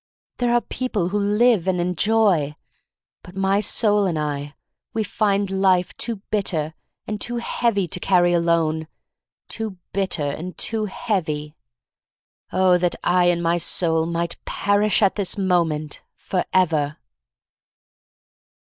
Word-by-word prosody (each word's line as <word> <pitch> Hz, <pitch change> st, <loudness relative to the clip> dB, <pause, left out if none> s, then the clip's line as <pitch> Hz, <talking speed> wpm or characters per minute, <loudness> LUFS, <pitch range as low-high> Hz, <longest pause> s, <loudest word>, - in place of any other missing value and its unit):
There 245 Hz, -1 st, +1 dB
are 240 Hz, 0 st, +3 dB
people 220 Hz, -6 st, -2 dB
who 205 Hz, +2 st, 0 dB
live 210 Hz, -1 st, +3 dB
and 185 Hz, -1 st, +1 dB
enjoy. 180 Hz, -4 st, +2 dB, 0.7 s
But 180 Hz, -, -14 dB
my 195 Hz, +1 st, +2 dB
soul 210 Hz, -1 st, +2 dB
and 170 Hz, -3 st, -1 dB
I 145 Hz, -1 st, -3 dB, 0.2 s
— -, -, -62 dB
we 220 Hz, -, +1 dB
find 200 Hz, -1 st, 0 dB
life 190 Hz, -2 st, +2 dB
too 225 Hz, -4 st, -3 dB
bit 205 Hz, -2 st, +1 dB
ter, 155 Hz, -3 st, -1 dB, 0.3 s
and 210 Hz, -1 st, -4 dB
too 240 Hz, -, -1 dB
heavy 230 Hz, -4 st, 0 dB
to 180 Hz, -, -2 dB
carry 175 Hz, -2 st, +3 dB
alone. 165 Hz, -2 st, +1 dB, 0.6 s
Too 220 Hz, -4 st, -4 dB, 0.2 s
bitter, 190 Hz, -5 st, 0 dB
and 165 Hz, +6 st, -5 dB
too 220 Hz, -1 st, -1 dB
heavy. 160 Hz, -8 st, -3 dB, 1.0 s
Oh, 185 Hz, -1 st, +4 dB
that 175 Hz, 0 st, 0 dB
I 180 Hz, 0 st, +3 dB
and 175 Hz, -1 st, +2 dB
my 170 Hz, +1 st, +2 dB
soul 165 Hz, -1 st, 0 dB
might 170 Hz, 0 st, -3 dB
perish 205 Hz, +1 st, +1 dB
at 195 Hz, -, +3 dB
this 200 Hz, -1 st, -1 dB
moment, 170 Hz, -6 st, 0 dB
forever! 160 Hz, -5 st, 0 dB
185 Hz, 135 wpm, -22 LUFS, 170-205 Hz, 1.0 s, Oh